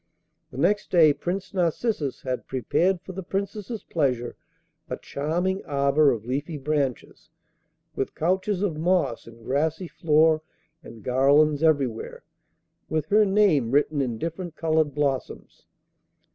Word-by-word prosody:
The - - -11
next 195 +8 +1
day 160 -5 +6
Prince 185 +5 -4
Narcissus 175 - -1
had 130 -1 -4
prepared 170 - 0
for 190 - -9
the 190 +1 -6
Princess's 200 +4 -4
pleasure 125 -7 -1 0.5
a - - -3
charming 175 +7 -2
arbour 140 +1 +3
of 115 -4 -2
leafy 145 +6 -3
branches, 140 -3 -3 0.7
with 135 - -3
couches 185 +4 0
of 170 -7 -1
moss 170 -9 0
and 115 0 -14
grassy 155 +7 -1
floor 155 -1 +3 0.4
and 110 -3 -13
garlands 140 +4 +3
everywhere, 140 -8 0 0.7
with 155 -2 -1
her 210 +1 +5
name 190 - +3
written 145 +2 +2
in 120 -4 -2
different 165 +4 -5
coloured 155 -3 +1
blossoms. 140 -3 -3
155 Hz, 130 wpm, -25 LUFS, 135-180 Hz, 0.7 s, day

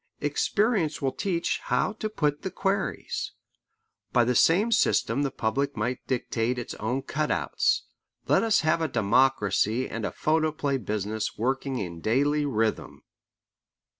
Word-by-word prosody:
Experience 200 -8 +1
will 135 -2 0
teach 175 0 -1
how 200 - +1
to 215 0 -4
put 150 -7 -1
the 190 - -3
queries. 195 +2 -2 0.8
By 120 - +4
the 125 +2 +1
same 185 - +4
system 145 - +2
the 140 - +1
public 135 +4 -1
might 120 +4 -3
dictate 125 -1 -1
its 120 - -5
own 125 +5 -2
cut 150 +2 -2
outs. - - +1 0.4
Let - - +4
us 225 -2 +3
have 165 +1 +2
a 160 - +1
democracy 115 -1 +2
and 115 0 -5
a - - -1
photoplay 155 -3 0
business 105 0 -3
working 130 +3 -1
in 85 -6 -5
daily 145 - +1
rhythm. 110 -4 -1
135 Hz, 140 wpm, -27 LUFS, 115-155 Hz, 0.8 s, By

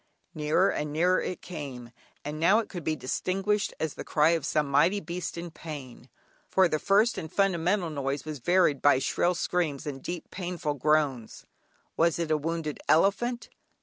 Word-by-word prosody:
Nearer 155 +5 +2
and 150 0 -3
nearer 180 +4 +2
it 180 - -5
came; 135 -8 -7 0.3
and 150 +1 -4
now 185 +6 +5
it 225 -2 -1
could 175 -4 -6
be 155 - 0
distinguished 195 +9 -1
as 160 -2 -2
the - - -7
cry 150 0 +3
of 165 -4 0
some 150 -1 +1
mighty 165 +8 +3
beast 175 -2 -5
in 170 0 -6
pain, 140 -6 -9 0.4
for 190 -1 +4
the 155 -2 -1
first 210 +6 +3
and 160 - -7
fundamental 185 -2 +1
noise 140 -1 -3
was 155 -2 -5
varied 175 -1 +2
by 145 -2 +5
shrill 175 +6 +1
screams 165 -5 -1
and 135 -3 -5
deep, 175 +2 -6
painful 175 -5 -3
groans. 145 -4 0 0.5
Was 165 0 +3
it 165 -2 -2
a 155 - +4
wounded 160 0 -3
elephant? 215 +8 +2
160 Hz, 175 wpm, -28 LUFS, 150-180 Hz, 0.5 s, now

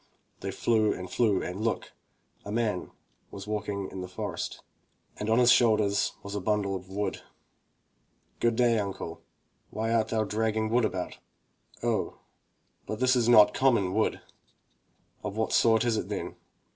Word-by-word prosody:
They - - -4
flew 110 -2 +2
and 90 0 -6
flew 110 -5 +2
and 90 +3 -5
look! 115 - -1 0.3
— - - -39
a 100 - -7
man 110 -4 0 0.4
v/as 95 - -8
walking 105 -2 -3
in 95 - -6
the 90 - -5
forest, 90 - -5 0.5
and 105 - -3
on 110 - +4
his 125 -1 +6
shoulders 105 -5 +3
was 100 - -7
a 105 - -1
bundle 100 -1 0
of 95 0 -8
wood. 100 +2 -3 1.2
"Good 120 -1 +2
day, 120 -2 +3
uncle, 95 -5 -5 0.5
why 110 +2 -2
art 115 -1 +2
thou 110 -1 0
dragging 110 +1 -1
wood 120 -1 +3
about?" 90 - -4 0.6
"Oh, - - -1 0.7
but 110 - -4
this 130 0 +4
is 120 -1 +2
not 105 -3 +7
common 115 -9 +2
wood!" 110 +2 +1 1.0
"Of 100 - -5
what 110 - 0
sort 115 0 +4
is 115 -2 +1
it, - - -3
then?" - - -4
110 Hz, 160 wpm, -28 LUFS, 100-115 Hz, 1.2 s, not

